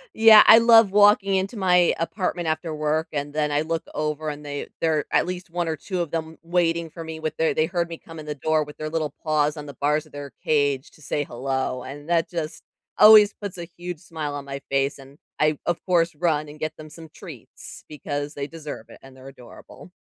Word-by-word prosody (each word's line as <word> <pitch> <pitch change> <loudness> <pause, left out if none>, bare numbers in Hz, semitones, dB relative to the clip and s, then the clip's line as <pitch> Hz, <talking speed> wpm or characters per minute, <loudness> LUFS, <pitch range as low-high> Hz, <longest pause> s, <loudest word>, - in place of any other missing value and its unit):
Yeah, 220 -1 +9
I 225 - +10
love 230 -3 +6
walking 205 -1 +4
into 190 +4 -1
my 180 -3 +3
apartment 175 0 -2
after 155 0 -2
work, 155 +1 -1
and 145 0 -3
then 150 0 -1
I 145 +1 +1
look 165 +1 -3
over 150 0 -2
and 150 0 -7
they 145 -1 -5
they're 160 -2 +1
at - - +2
least 180 -1 -6
1 175 0 -2
or 160 - -1
2 180 +5 -4
of 170 - -3
them 160 -1 -5
waiting 170 -1 0
for 165 +1 -9
me 160 0 -7
with 160 -1 -4
their 160 - +1
they 155 - +1
heard 170 -1 -1
me 165 -1 -8
come 165 -1 -13
in 155 - -9
the 150 - -4
door 155 +2 0
with 150 0 -12
their 155 - -4
little 155 -2 -2
paws 150 -1 +1
on 150 -1 -8
the 140 - -10
bars 150 +3 0
of - - -23
their 145 -1 -8
cage 145 -3 +1
to - - -21
say 145 +1 -2
hello, 130 0 -3
and 145 +4 -10
that 165 -1 +2
just 165 -3 -5 0.3
always 210 -1 +8
puts 200 -3 -8
a 170 - -7
huge 175 -2 -6
smile 160 -5 -6
on 140 -1 -6
my 140 0 -6
face, 135 +1 0
and 135 +1 -15 0.2
I, 155 -1 +2
of 170 - +1
course, 170 -2 +1
run 155 -2 0
and 150 +1 -12
get 155 0 -4
them 155 0 -11
some 160 +1 -12
treats - - -12
because 145 0 -5
they 140 0 -5
deserve 155 -2 -9
it, - - -13
and 135 0 -15
they're 130 0 -13
adorable. 135 +6 -14
155 Hz, 230 wpm, -23 LUFS, 145-170 Hz, 0.3 s, I